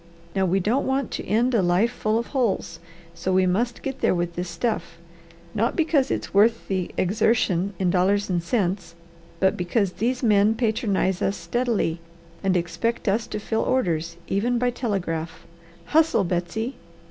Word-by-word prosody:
Now 190 -1 +2
we 190 +3 +2
don't 225 +9 +1
want 265 -1 0
to - - -5
end 240 +4 +2
a 225 - +4
life 180 +6 +2
full 215 -2 0
of 235 - -1
holes, 225 -10 0 0.3
so 185 +2 -3
we 185 0 +4
must 230 +7 0
get 270 -1 -4
there - - +3
with 175 0 -1
this 175 +1 -4
stuff, 170 -1 -2 0.6
not 225 +2 0
because 310 -5 +2
it's - - -3
worth 225 +3 +3
the 185 -2 -1
exertion 195 -1 +1
in 180 -1 +1
dollars 195 +2 +2
and 175 -2 0
cents, 180 -3 -1 0.4
but 190 0 +3
because 180 +2 0
these 245 +6 -1
men 210 -1 +4
patronize 210 -5 0
us 195 - 0
steadily 235 -9 -1 0.4
and 190 -1 +2
expect 175 +8 -2
us 215 +3 +1
to 210 - -4
fill 220 +1 -1
orders, 170 -9 0
even 235 +5 +1
by 245 +1 +1
telegraph. 175 -9 -3 0.4
Hustle, 315 -8 +3
Betsy!" 185 +8 -2
200 Hz, 165 wpm, -24 LUFS, 180-235 Hz, 0.6 s, a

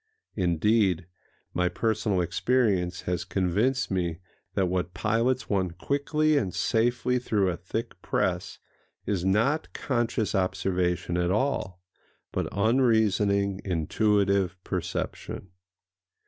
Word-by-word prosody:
Indeed, 95 0 +2 0.5
my 90 0 +1
personal 105 0 0
experience 100 -2 +1
has 90 -1 -2
convinced 100 +9 0
me 85 -3 -1 0.4
that 95 - +2
what 90 -1 -2
pilots 115 +7 +1
one 95 -3 +1
quickly 145 - +1
and 95 -8 -3
safely 120 +2 +1
through 105 -6 +1
a - - -3
thick 95 +7 -5
press - - -1 0.5
is 95 -4 -1
not 115 +12 +1
conscious 120 -4 -1
observation 95 -2 0
at 90 0 +1
all, 95 -5 -1 0.5
but - - -1
unreasoning, 100 -3 +2
intuitive 100 +1 +1
perception. 95 - -4
100 Hz, 105 wpm, -27 LUFS, 90-115 Hz, 0.5 s, Indeed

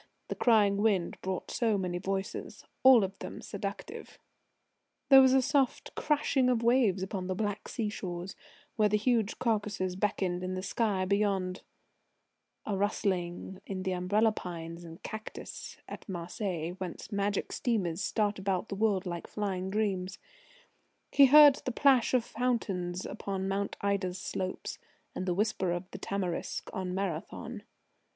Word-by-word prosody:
The - - -2
crying 210 -4 +4
wind 200 -4 +1
brought 190 -1 -3
so 225 -4 +1
many 180 -2 -2
voices, 195 +1 -4 0.2
all 255 -4 +8
of 195 0 -3
them - - -7
seductive: 205 - -6 0.9
There 270 -1 +10
was 260 -1 +6
a 265 -1 +5
soft 275 -1 +1
crashing 285 -3 +2
of 240 -2 +1
waves 230 -6 +3
upon 190 -1 -4
the 185 - -1
Black 205 0 -2
Sea 225 -4 -2
shores, 185 -3 -5 0.4
where 210 -1 +4
the 210 - +3
huge 225 -1 +1
Caucasus 205 -5 -1
beckoned 185 -2 -1
in 185 0 -2
the 185 - -4
sky 200 -3 0
beyond; 195 -2 0 1.0
a 205 - -1
rustling 190 -2 -1
in 190 -1 -4
the 190 - -1
umbrella 200 +5 +2
pines 170 -3 -7
and 165 0 -11
cactus 220 0 -7
at - - -9
Marseilles, 175 -1 -3
whence 185 +3 -6
magic 200 0 -1
steamers 195 -7 -1
start 210 -1 0
about 190 +1 -1
the 200 - -3
world 200 -2 +1
like 175 -2 -4
flying 190 -3 -3
dreams. 195 -3 -1 0.9
He 280 -1 +7
heard 290 0 +9
the 255 - -2
plash 260 -1 +4
of 240 -2 +2
fountains 195 -7 -1
upon 195 -1 -3
Mount 195 +1 -2
Ida's 195 -2 0
slopes, 185 0 -4 0.3
and 185 - -4
the 180 - +1
whisper 195 -3 0
of 175 +2 -4
the - - -7
tamarisk 190 -3 -3
on 185 -1 -3
Marathon. 200 +5 -4
200 Hz, 150 wpm, -30 LUFS, 185-220 Hz, 1.0 s, There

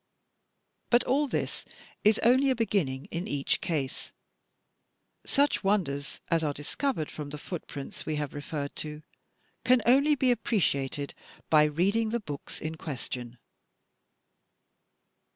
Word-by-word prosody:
But 240 +1 +5
all 285 +3 +2
this - - -2 0.4
is 215 +1 +5
only 260 +4 +5
a 260 - +3
beginning 165 - 0
in 170 +3 -3
each 140 -1 0
case. 145 -6 -3 1.1
Such 285 -4 +2
wonders 160 -9 0
as 165 -1 +2
are 150 -2 0
discovered 160 - -2
from 150 -2 -6
the 150 - -6
footprints 150 -3 -6
we 155 - -2
have 150 -2 -3
referred 145 0 -4
to 150 0 -5 0.6
can 250 -2 +4
only 280 +5 +5
be 260 -2 +3
appreciated 145 - 0 0.4
by 150 -1 +7
reading 195 +9 +2
the 235 +2 0
books 145 -9 -6
in 160 +1 -4
question. 125 -5 -5
160 Hz, 125 wpm, -29 LUFS, 145-235 Hz, 1.1 s, by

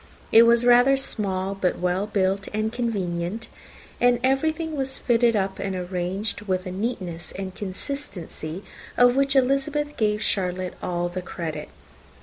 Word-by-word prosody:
It 230 +1 +8
was 235 +1 +4
rather 245 +3 +6
small, 195 -7 -1
but 190 -2 0
well 180 +3 0
built 195 -1 0
and 215 +1 -1
convenient; 200 -3 -2 0.5
and 245 0 +4
everything 310 +4 +1
was 270 -1 -1
fitted 235 -1 +3
up 195 -1 -1
and 195 -1 -2
arranged 185 +4 -3
with 185 -1 0
a 185 - -4
neatness 185 -4 -4
and 190 -1 -5
consistency, 190 - -6 0.3
of 245 0 +6
which 275 0 +2
Elizabeth 275 +3 +1
gave 210 -1 +1
Charlotte 185 -2 -1
all 175 0 -1
the 180 +1 -4
credit. 170 -3 -5
205 Hz, 140 wpm, -24 LUFS, 185-245 Hz, 0.5 s, It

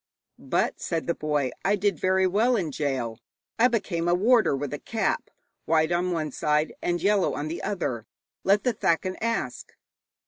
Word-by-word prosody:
'But,' - - -1
said 165 -2 -2
the 170 - +1
boy, 150 -5 -1
'I 200 +2 +3
did 200 -4 0
very 190 0 +2
well 220 +7 +3
in 175 -8 -1
gaol. 130 -6 -2 0.4
I 240 - +7
became 195 -8 -1
a 175 - +4
warder 220 - +4
with 145 +1 -4
a 145 - -4
cap 225 -1 -1 0.4
white 160 0 +2
on 175 +1 +1
one 155 -3 -2
side 150 +3 0
and 175 0 0
yellow 200 +1 +2
on 150 +2 -3
the 165 - -4
other. 130 - -3 0.4
Let 200 +1 +3
the 250 - +1
thakin 185 -1 0
ask.' 225 - -3
175 Hz, 175 wpm, -26 LUFS, 150-205 Hz, 0.4 s, I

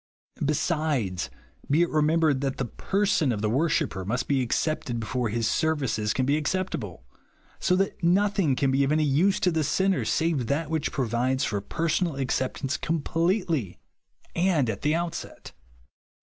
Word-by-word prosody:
Besides, 145 - 0 0.4
be 155 +5 +4
it 175 - -1
remem 155 +2 +2
bered 145 -5 +2
that 135 -1 -2
the 135 - -1
person 190 - 0
of 105 -2 -3
the 105 - +1
worshipper 135 - 0
must 125 +7 -2
be 140 -2 +2
accepted 125 -1 -1
before 120 +1 -2
his 115 +1 0
services 135 -10 0
can 130 +4 0
be 145 +3 +1
accejjtable; 140 - -3 0.6
so 180 - +2
that 195 -1 -1
nothing 190 -4 +3
can 135 0 +1
be 135 +1 +3
of 135 - +1
any 155 0 +3
use 155 +8 +2
to 180 - +3
the 160 -1 0
sinner 190 +6 +1
save 160 -7 0
that 150 +3 -1
which 160 -2 -1
provides 130 +1 0
for 100 -5 -1
personal 165 - -1
acceptance 135 +1 -1
completely, 165 - -1 0.6
and 170 -9 +2
at 100 - -7
the 150 +2 +2
outset. 170 0 -5
145 Hz, 160 wpm, -26 LUFS, 125-165 Hz, 0.6 s, be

